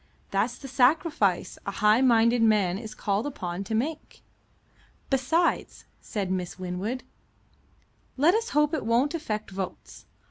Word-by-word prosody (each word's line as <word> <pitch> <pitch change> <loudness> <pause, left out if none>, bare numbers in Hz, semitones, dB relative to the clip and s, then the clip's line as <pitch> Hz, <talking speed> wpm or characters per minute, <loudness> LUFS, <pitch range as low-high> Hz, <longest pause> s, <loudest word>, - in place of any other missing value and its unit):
That's 215 +5 0
the 275 - -9
sacrifice 255 - +2
a - - -4
high 215 +3 +3
minded 235 -2 +4
man 205 -5 +3
is 220 -1 -8
called 205 +5 -1
upon 185 -8 -4
to 220 - -2
make." 295 +7 -4 0.9
"Besides," 320 +6 0 0.2
said 195 -3 -3
Miss 180 -2 -3
Winwood, 185 +7 -4 1.1
"let 310 +7 +5
us 455 +2 0
hope 300 +1 +2
it 310 - -1
won't 240 +7 +2
affect 215 -11 -4
votes. 190 -1 -7
230 Hz, 135 wpm, -27 LUFS, 195-275 Hz, 1.1 s, let